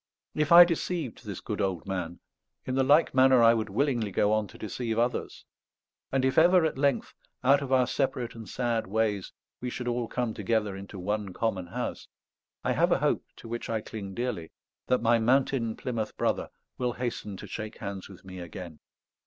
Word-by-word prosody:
If 150 0 0
I 175 +1 +11
deceived 170 -6 -3
this - - -5
good - - -3
old 95 -4 -1
man, 90 -3 -4 0.4
in 130 - -2
the 135 - +2
like 145 +5 +4
manner 130 -2 +6
I 115 0 +7
would 110 -2 -1
willingly 120 0 0
go 105 +2 +2
on 110 -1 +1
to - - -14
deceive 110 +1 -3
others. 120 +1 -1 0.7
And 130 -1 +2
if 130 +3 +3
ever 175 +1 +6
at 160 - 0
length, 140 0 0 0.3
out 140 +2 +5
of 135 -2 -5
our 130 -1 +5
separate 130 -2 -1
and 110 -4 -10
sad 120 -2 -1
ways, 105 -1 0 0.3
we 125 - -3
should 125 0 -5
all 120 -1 -1
come 120 -2 -2
together 105 -1 0
into 100 +1 -9
one 100 +1 -2
common 100 -5 -1
house, - - -4 0.6
I - - +1
have - - +2
a - - +5
hope, - - 0
to - - -12
which 120 +1 -5
I 115 -1 0
cling 100 -3 -7
dearly, 120 -10 -3 0.4
that 125 - +2
my 115 0 +4
mountain 125 -1 +2
Plymouth 115 -4 -4
Brother - - 0 0.3
will 125 -1 0
hasten 115 -5 -4
to - - -8
shake 105 +2 -6
hands 100 -2 -6
with 95 -1 -14
me 95 -1 -8
again. 85 -2 -8
115 Hz, 195 wpm, -28 LUFS, 100-130 Hz, 0.7 s, I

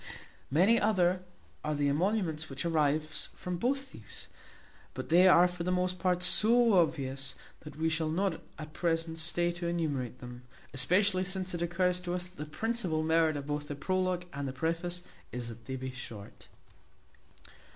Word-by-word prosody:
Many 190 - +4
other 185 -4 +2 0.4
are 150 0 -1
the 145 0 +1
emoluments 160 0 0
which 135 +3 -4
arise 155 -1 0
from 180 -1 -4
both 265 +6 -1
these, - - -7 0.7
but - - -5
they 180 +3 +6
are 180 -1 +7
for 180 -1 -5
the 180 - 0
most 180 0 0
part 180 -1 +1
so 230 +5 +5
obvious, 135 -7 +1 0.2
that 150 - -11
we 160 +2 0
shall 160 -1 0
not 180 +1 0 0.2
at 155 -1 -8
present 165 -1 -1
stay 175 +1 +2
to 175 0 -4
enumerate 145 -8 -2
them; 125 0 -9 0.3
especially 185 +7 +3
since 190 0 -2
it 175 - -3
occurs 180 +1 +1
to 180 0 -3
us 180 0 -2
that 180 -4 -7
the 150 - -11
principal 185 -5 -1
merit 160 -1 +3
of 140 - -5
both 145 0 -3
the 145 - -4
prologue 185 +3 -1
and 140 0 -3
the 130 - -4
preface 170 +4 -2 0.3
is 120 -1 -3
that 115 0 -11
they 130 - -4
be 130 0 -5
short. 115 -5 -10
170 Hz, 170 wpm, -31 LUFS, 150-180 Hz, 0.7 s, are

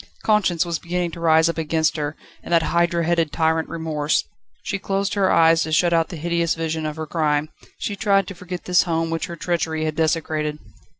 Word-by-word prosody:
Conscience 195 -6 +2
was 170 -2 -2
beginning 175 0 -2
to 170 - -9
rise 160 0 +4
up 165 0 -2
against 160 0 +1
her, 150 -1 -3 0.3
and - - -10
that 165 -1 +4
hydra 170 0 +1
headed 165 -2 +1
tyrant 160 +1 +1
Remorse. 160 -2 -1 0.4
She 195 - -3
closed 195 +1 -1
her 195 -2 +2
eyes 165 0 +5
to 160 - -2
shut 170 +2 +3
out 165 -1 +2
the - - -6
hideous 170 +1 0
vision 160 -1 -2
of 150 - -4
her 160 -1 -5
crime; 150 -1 0 0.3
she 205 - -3
tried 200 -1 +2
to - - -6
forget 180 0 -7
this 180 -1 +4
home 165 -1 -1
which 165 +2 -2
her 170 - -6
treachery 165 -2 -1
had 155 -1 -2
desecrated. 155 -1 0
165 Hz, 205 wpm, -22 LUFS, 160-175 Hz, 0.4 s, eyes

